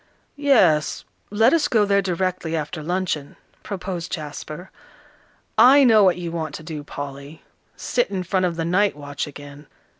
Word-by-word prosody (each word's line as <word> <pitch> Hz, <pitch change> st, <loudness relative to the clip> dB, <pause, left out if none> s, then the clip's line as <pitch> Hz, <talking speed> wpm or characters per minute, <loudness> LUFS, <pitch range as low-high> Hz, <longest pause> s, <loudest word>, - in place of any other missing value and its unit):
"Yes, 190 Hz, -, +3 dB, 0.2 s
let 225 Hz, +6 st, +3 dB
us 330 Hz, -3 st, +3 dB
go 220 Hz, -4 st, +3 dB
there 200 Hz, 0 st, +2 dB
directly 180 Hz, -2 st, -2 dB
after 155 Hz, 0 st, -4 dB
luncheon," 170 Hz, -3 st, -3 dB, 0.3 s
proposed 185 Hz, -3 st, -5 dB
Jasper. 155 Hz, +2 st, -7 dB, 0.9 s
"I 265 Hz, +5 st, +8 dB
know 220 Hz, -5 st, +6 dB
what 185 Hz, -2 st, +4 dB
you 170 Hz, -2 st, -5 dB
want 160 Hz, -3 st, -4 dB
to -, -, -9 dB
do, 155 Hz, -2 st, -7 dB
Polly, 145 Hz, +1 st, -8 dB, 0.3 s
sit 245 Hz, -4 st, -1 dB
in 190 Hz, -2 st, -3 dB
front 185 Hz, +1 st, 0 dB
of 170 Hz, -, -4 dB
'The 165 Hz, -1 st, -2 dB
Night 190 Hz, +3 st, +2 dB
Watch' 145 Hz, -1 st, -5 dB
again." 145 Hz, 0 st, -11 dB
175 Hz, 155 wpm, -22 LUFS, 150-200 Hz, 0.9 s, I